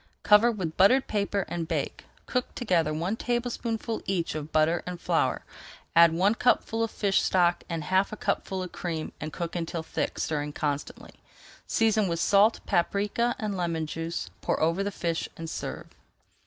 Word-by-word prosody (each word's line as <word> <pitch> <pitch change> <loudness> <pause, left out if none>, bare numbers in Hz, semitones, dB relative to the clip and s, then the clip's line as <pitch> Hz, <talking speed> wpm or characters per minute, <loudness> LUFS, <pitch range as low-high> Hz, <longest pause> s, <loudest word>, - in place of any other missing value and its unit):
Cover 210 +3 +6
with 180 -8 -4
buttered 255 +8 +5
paper 200 -2 -1
and 170 -2 -3
bake. - - -3 0.2
Cook 250 -1 -2
together 175 -10 +1
one 170 +7 -1
tablespoonful 235 -1 -2
each 185 -3 -1
of 155 0 -5
butter 160 +2 +3
and 180 -1 -5
flour, - - 0 0.5
add 170 0 +8
one 185 +6 +3
cupful 230 -1 +1
of 225 - -1
fish 200 -3 +1
stock 175 -2 +2
and 165 -2 -3
half 190 +4 +2
a 215 - -6
cupful 190 -2 -2
of 180 - -7
cream, 165 -3 -4
and 155 - -4
cook 170 +1 -5
until 165 -1 -3
thick, - - -3
stirring 150 -1 -2
constantly. 145 -1 -4 0.5
Season 220 -2 +2
with 170 -1 -1
salt, 205 +5 +4
paprika, 205 +5 +1
and 215 -4 -3
lemon 170 -3 -1
juice. 165 +2 -4
Pour - - 0
over 165 +5 +1
the 200 - -1
fish 170 -4 -2
and 165 - -6
serve. - - -5
185 Hz, 170 wpm, -27 LUFS, 165-210 Hz, 0.5 s, add